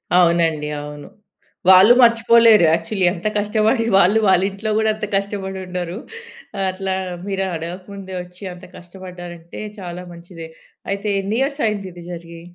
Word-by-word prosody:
అవునండి. 165 -4 +3
అవును. 145 0 -9 0.6
వాళ్ళు 190 +5 +8
మర్చిపోలేరు 230 -3 +6
యాక్చువల్లీ 175 +4 0
ఎంత 180 +3 -4
కష్టపడి 215 +3 +1
వాళ్ళు 200 +3 +4
వాళ్ళ 190 -1 +4
ఇంట్లో 200 +3 -5
గూడా 220 0 +2
అంత 215 0 -4
కష్టపడి 195 -1 -3
ఉండరు. 180 0 -5 0.6
ఆ - - -4
అట్లా 190 0 -3 0.3
మీరు 195 -1 -2
అడగక 170 +3 -6
ముందే 190 -1 -8
వచ్చి 180 +2 -16
అంత 180 +1 -13
కష్టపడ్డారంటే 175 -2 -10 0.2
చాలా 180 -1 -7
మంచిదే. 170 -1 -11 0.4
అయితే 200 +1 -2
ఎన్ని 205 +4 -2
ఇయర్స్ 280 +2 -2
అయిందిది 190 -5 -5
జరిగి? 170 -1 -9
190 Hz, 140 wpm, -20 LUFS, 175-210 Hz, 0.6 s, వాళ్ళు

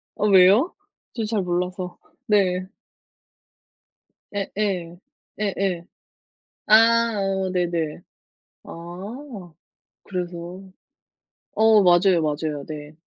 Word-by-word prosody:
어 210 - 0
왜요? 195 - +5 0.4
저 230 - -3
잘 215 -1 -1
몰라서. 180 0 -3 0.3
네. 185 -4 +2 1.7
예예. 195 -4 -3 0.4
예예. 195 -4 -1 0.8
아 215 - +7 0.4
어 195 -1 -1
네네. 170 -4 -2 0.6
아. 190 - -9 0.5
그래서. 180 0 -6 0.9
어 220 -1 +5
맞아요, 175 -1 +4
맞아요. 150 -1 -2
네. 150 -1 -8
185 Hz, 135 characters per minute, -23 LUFS, 175-200 Hz, 1.7 s, 아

